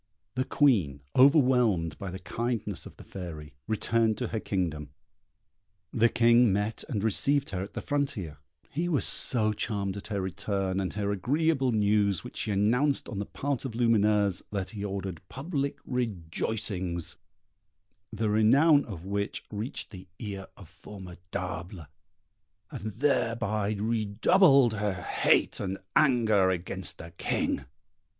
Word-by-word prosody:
The 130 +1 -1
Queen, 100 - +2 0.2
overwhelmed 125 - +4
by 100 - -5
the 95 - -6
kindness 110 -3 -3
of - - -15
the - - -11
Fairy, 80 -6 -8
returned 110 0 +1
to 125 -1 -3
her 110 - -2
kingdom; 80 -8 -2 1.0
the 115 0 +4
King 120 -1 +5
met 105 +3 -1
and 105 -7 -2
received 135 +6 +3
her 90 -1 -2
at 100 - -8
the - - -4
frontier; 110 - -2 0.3
he 170 +4 -1
was 150 -5 +1
so 110 -4 +1
charmed 100 -2 -2
at 100 - -7
her 100 -2 -2
return, 95 0 -2
and 95 -2 -2
the 105 -1 -2
agreeable 135 - +1
news 105 -3 +2
which - - -9
she - - -2
announced 120 +8 +2
on 105 - -4
the 100 - -3
part 140 -2 -2
of 130 -5 -5
Lumineuse, 105 -5 +2
that 100 -2 -3
he 105 -3 -6
ordered 95 -4 -4
public 140 -1 -3
rejoicings, 95 -5 -2 0.9
the 110 - -1
renown 140 +8 +5
of 90 -6 -8
which 100 +1 -2
reached 110 +6 -5
the 95 -3 -11
ear 100 -3 -6
of - - -12
Formidable, 90 -2 -7 0.9
and 110 +1 -5
thereby 115 -5 0
redoubled 115 - +4
her 105 -2 -1
hate 90 - +2
and 95 -1 -3 0.2
anger 110 -9 +4
against 95 0 -4
the 85 +1 -10
King. - - -1
105 Hz, 140 wpm, -28 LUFS, 95-120 Hz, 1.0 s, King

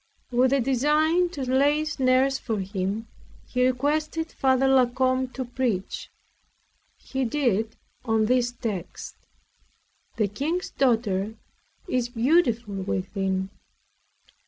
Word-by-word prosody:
With 250 +1 +3
a 275 - +3
design 300 +7 +2
to 290 -6 -5
lay 285 +4 +2
snares 270 -2 +2
for 220 -3 -2
him, 195 +3 -3 0.4
he 250 0 +1
requested 305 +5 -1
Father 265 0 +2
La 265 -2 +5
Combe 255 +1 +1
to 260 - -4
preach. 240 -6 -2 0.9
He 265 0 -3
did 225 -4 0 0.3
on 225 -2 +2
this 245 +1 +2
text 210 -7 -5 1.0
"The 215 -3 +1
King's 300 - -3
daughter 220 -5 +1 0.5
is 250 -7 0
beautiful 240 -3 +2
within." 190 0 -2
255 Hz, 110 wpm, -25 LUFS, 220-270 Hz, 1.0 s, La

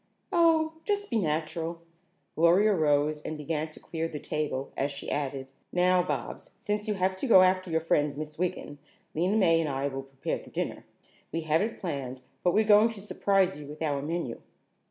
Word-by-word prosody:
"O, 325 -3 +4
just 410 -3 -1
be 230 - +2
natural." 165 0 -2 0.5
Gloria 180 +6 +4
rose 150 -2 +2
and 155 0 -5
began 155 +1 -2
to 155 - -13
clear 165 0 -3
the 155 - -6
table 145 -3 -3
as 140 +1 -1
she 140 - -6
added: 135 -2 -3 0.2
"Now, 180 0 +4
Bobs, - - -4
since 210 +1 -2
you 210 - 0
have 185 0 +1
to 270 - -2
go 190 -6 +8
after 185 0 +2
your 160 0 +1
friend, 150 -3 +1
Miss 155 0 -6
Wiggin, 180 -5 -3 0.3
Lena 180 +7 +1
May 165 -5 +4
and 155 - -1
I 135 +1 -1
will 135 0 -5
prepare 135 0 -4
the - - -14
dinner. - - -4 0.5
We 165 - -2
have 160 +1 +2
it 220 +2 -2
planned, 135 -7 -5 0.2
but 175 - +3
we're 215 - +5
going 215 +1 +6
to 225 -3 -7
surprise 195 -3 +1
you 145 - -9
with 150 +2 -6
our 145 -3 0
menu." 155 -5 -3
165 Hz, 195 wpm, -28 LUFS, 150-190 Hz, 0.5 s, go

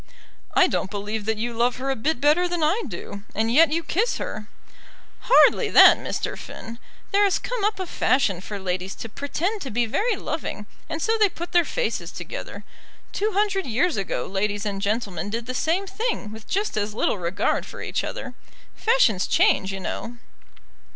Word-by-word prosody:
"I 380 - +7
don't 200 - -1
believe 210 +1 -4
that 220 0 0
you 235 +2 -2
love 240 +2 +1
her 270 +1 -2
a - - 0
bit 265 +4 -1
better 300 +6 +4
than 350 -2 -1
I 345 +10 +2
do, 200 - -7
and 225 +2 +1
yet 315 +2 +6
you 335 +2 0
kiss 415 +9 0
her." 210 0 -5 0.7
"Hardly 485 -2 +5
that, - - +8
Mr. - - -3
Finn. 230 +1 -9 0.3
There 405 +1 +4
has 395 -2 +3
come - - -4
up 415 -1 +1
a 375 - -2
fashion 250 - +1
for 205 +1 -6
ladies 185 0 -3
to - - -7
pretend 340 - -2
to 270 - -5
be 240 +1 +1
very 420 - 0
loving, 315 - -4 0.2
and 320 0 -3
so 450 0 +1
they 420 -2 +5
put 345 0 -7
their 345 -1 +5
faces - - -2
together. - - -7 0.5
Two 425 +1 -1
hundred 390 -2 +1
years 275 +9 +1
ago 195 -2 -2
ladies 205 +2 -2
and 200 -2 -3
gentlemen 200 -4 -2
did 230 +2 -3
the 255 - -4
same 335 +9 0
thing 390 - -3
with 220 0 -11
just 405 - -1
as 210 0 -2
little 210 - 0
regard 180 +4 0
for - - -10
each - - -2
other. - - -5 0.4
Fashions 435 - +3
change, 190 0 +3
you 195 - -5
know." 235 +5 -5
255 Hz, 190 wpm, -24 LUFS, -, 0.7 s, that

